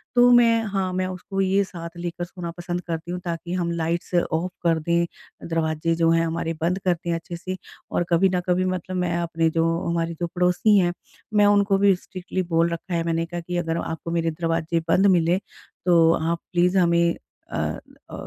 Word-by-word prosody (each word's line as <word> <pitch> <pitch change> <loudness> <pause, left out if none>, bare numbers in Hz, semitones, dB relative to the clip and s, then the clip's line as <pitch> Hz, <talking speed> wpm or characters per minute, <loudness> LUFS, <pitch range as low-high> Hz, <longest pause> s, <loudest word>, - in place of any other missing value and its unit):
तो 245 0 +7
मैं 230 -2 +5
हाँ 195 -2 -1
मैं 185 0 0
उसको 185 +1 -4
ये 195 +1 +3
साथ 170 -3 -7
लेकर 175 0 -4
सोना 175 -1 -7
पसंद 175 0 -3
करती 165 +1 -4
हूँ 180 - -3
ताकि 170 0 -4
हम 175 -2 -1
लाइट्स 170 +2 -2
ऑफ़ 175 +1 0
कर 165 -2 +3
दें, 170 +2 +1 0.4
दरवाज़े 165 0 0
जो 165 0 +2
हैं 165 0 +3
हमारे 165 0 -2
बंद 180 +3 +1
कर 180 - +4
दें 170 0 -3
अच्छे 165 +1 -6
से 185 +2 -5 0.3
और - - +1
कभी 180 +3 +4
न 180 - +2
कभी 180 +1 +2
मतलब 185 0 -3
मैं 175 -1 0
अपने 165 -1 0
जो 165 0 +1 0.2
हमारे 170 0 -1
जो 175 - -1
पड़ोसी 180 +4 +3
हैं, 175 -2 +2 0.4
मैं 210 -1 +5
उनको 205 -1 +4
भी 200 -1 +4
स्ट्रिक्टली 185 +1 -5
बोल 170 0 +2
रखा 170 +2 -5
है 165 - +1
मैंने 165 0 0
कहा 175 +1 -5
कि 175 +1 -4
अगर 165 -1 -1
आपको 165 +1 -5
मेरे 165 -1 0
दरवाजे 165 0 -1
बंद 190 +4 +4
मिले, 175 -1 +3 0.5
तो 165 -2 +5
आप 165 +1 -1
प्लीज़ 180 +1 +2
हमें 170 -1 +3 0.4
अ - - -1 0.5
अ, - - -12
170 Hz, 200 wpm, -24 LUFS, 165-185 Hz, 0.5 s, तो